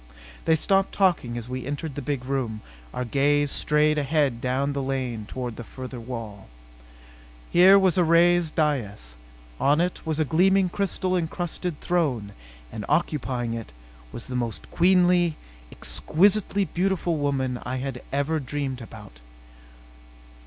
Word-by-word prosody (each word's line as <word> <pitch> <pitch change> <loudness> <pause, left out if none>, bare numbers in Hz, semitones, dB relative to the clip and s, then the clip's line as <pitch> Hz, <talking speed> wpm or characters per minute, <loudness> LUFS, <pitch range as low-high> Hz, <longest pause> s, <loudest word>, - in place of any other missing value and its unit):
They 160 - +4
stopped 195 +4 +2
talking 170 -12 +1
as 120 -1 -6
we 130 0 -4
entered 145 +2 -4
the 145 - -5
big 135 -2 -3
room. 125 -5 -2 0.3
Our 125 - -3
gaze 145 +3 +2
strayed 150 0 +2
ahead 140 -4 +1
down 135 +3 0
the 140 - -2
lane 130 -5 -3
toward 125 -3 -5
the 120 - -6
further 130 +1 -8
wall. 115 -4 -7 1.0
Here 185 +3 +7
was 190 -2 +3
a - - +5
raised 170 0 +3
dais. 105 - -1 0.4
On 145 +3 +3
it 180 +1 -1
was 160 -2 -2
a 155 - +2
gleaming 185 +4 +3
crystal 185 -1 -1
encrusted 175 -1 -3
throne. 135 -13 0 0.4
And 105 - -6
occupying 130 -6 0
it 115 - -7 0.4
was 115 - -6
the 125 - -6
most 120 -4 -4
queenly, 175 -2 +3 0.3
exquisitely 200 +3 +1
beautiful 175 -1 0
woman 135 -3 -1
I 130 - -3
had 130 -1 -4
ever 140 +3 0
dreamed 135 -2 -4
about. 105 - -12
145 Hz, 140 wpm, -25 LUFS, 125-170 Hz, 1.0 s, Here